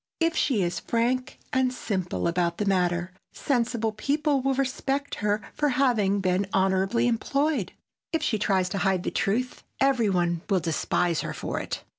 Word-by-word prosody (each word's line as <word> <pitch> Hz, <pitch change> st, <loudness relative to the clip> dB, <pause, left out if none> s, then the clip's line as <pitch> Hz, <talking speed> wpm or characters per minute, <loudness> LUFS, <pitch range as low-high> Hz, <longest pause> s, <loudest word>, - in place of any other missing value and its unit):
If 330 Hz, 0 st, +2 dB
she 230 Hz, -9 st, +2 dB
is 175 Hz, 0 st, -1 dB
frank 250 Hz, +3 st, -1 dB, 0.2 s
and 260 Hz, -1 st, +2 dB
simple 190 Hz, -9 st, -2 dB
about 170 Hz, 0 st, 0 dB
the 210 Hz, -, -1 dB
matter, 180 Hz, -2 st, +1 dB, 0.2 s
sensible 235 Hz, -4 st, 0 dB
people 285 Hz, +5 st, 0 dB
will 270 Hz, +1 st, +1 dB
respect 275 Hz, +1 st, -1 dB
her 210 Hz, +1 st, 0 dB
for 295 Hz, -, +1 dB
having 230 Hz, -7 st, +2 dB
been 185 Hz, +1 st, +1 dB
honorably 195 Hz, +4 st, +2 dB
employed. 260 Hz, -, 0 dB, 0.4 s
If 325 Hz, -2 st, 0 dB
she 215 Hz, -, 0 dB
tries 190 Hz, -3 st, +2 dB
to 195 Hz, -, -2 dB
hide 190 Hz, -2 st, +1 dB
the -, -, -2 dB
truth, 245 Hz, +6 st, -1 dB, 0.2 s
every 265 Hz, -5 st, +3 dB
one 175 Hz, -3 st, +1 dB
will 195 Hz, -2 st, +3 dB
despise 170 Hz, +1 st, 0 dB
her -, -, -4 dB
for -, -, -3 dB
it. -, -, -5 dB
215 Hz, 165 wpm, -26 LUFS, 185-260 Hz, 0.4 s, every